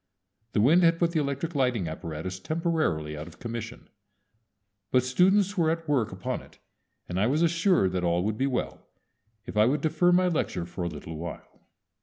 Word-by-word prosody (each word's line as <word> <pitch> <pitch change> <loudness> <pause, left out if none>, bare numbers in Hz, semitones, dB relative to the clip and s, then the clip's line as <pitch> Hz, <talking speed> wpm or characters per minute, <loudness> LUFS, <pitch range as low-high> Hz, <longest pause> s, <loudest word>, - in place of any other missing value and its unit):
The 105 - +3
wind 155 +10 +5
had 165 -1 +4
put 170 0 +1
the 165 - +1
electric 140 +3 -2
lighting 125 - +1
apparatus 80 +3 -5
temporarily 155 - -1
out 75 +2 -7
of 85 - -13
commission; 115 0 -7 1.0
but 125 -1 +3
students 190 +9 +3
were 160 -2 +3
at 165 0 -2
work 125 -7 +1
upon 95 0 -4
it, - - -18 0.5
and 90 +1 -2
I 105 - +3
was 150 +6 +2
assured 170 - +3
that 90 -1 -2
all 85 0 +1
would 110 +2 -1
be 135 - +2
well 130 -3 -3 0.6
if - - -8
I 105 +1 +5
would 145 +4 +1
defer 160 +3 +2
my 180 +1 +4
lecture 150 - -1
for 85 +2 -7
a - - -1
little 80 0 -8
while. 85 +1 -8
125 Hz, 190 wpm, -27 LUFS, -, 1.0 s, wind